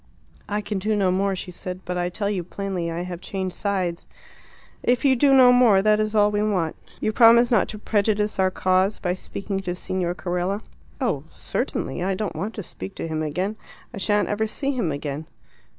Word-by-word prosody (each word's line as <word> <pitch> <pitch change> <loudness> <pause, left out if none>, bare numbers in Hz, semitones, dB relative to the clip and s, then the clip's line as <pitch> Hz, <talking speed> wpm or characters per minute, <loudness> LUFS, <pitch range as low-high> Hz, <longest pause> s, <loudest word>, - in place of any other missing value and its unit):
"I 210 +1 -1
can 205 -1 -3
do 215 +3 0
no 195 -3 +2
more," 195 +1 +1
she 180 0 -6
said. 180 +1 -6
"But 180 - -3
I 175 0 0
tell 200 +3 -2
you 200 -3 -1
plainly 185 -1 -3
I 165 +1 -3
have 180 -1 -6
changed 190 -1 -4
sides." 185 -4 -2 0.7
"If 245 +3 +1
you 265 -1 +5
do 275 +3 +4
no 260 -2 +8
more, 225 -6 +5
that 215 0 +4
is 215 0 -1
all 210 0 +5
we 205 0 0
want. 185 -7 0 0.2
You 215 - 0
promise 235 +2 +6
not 225 -5 +4
to 215 - -6
prejudice 210 -1 0
our 190 0 +4
cause 185 +2 +1
by 180 -1 -1
speaking 195 +1 -4
to 180 -2 -3
Signor 180 -1 -2
Carella?" 180 +3 -2 0.4
"Oh, - - -1
certainly. - - -3
I 190 +1 0
don't 210 +1 -3
want 210 +4 -4
to 210 - -5
speak 95 - -8
to - - -4
him 155 -1 -2
again; 180 +8 -2 0.4
I 205 - -6
shan't 205 +1 +1
ever 220 +1 0
see 275 +5 -2
him 235 - -1
again." 145 +1 -4
195 Hz, 205 wpm, -24 LUFS, 180-215 Hz, 0.7 s, no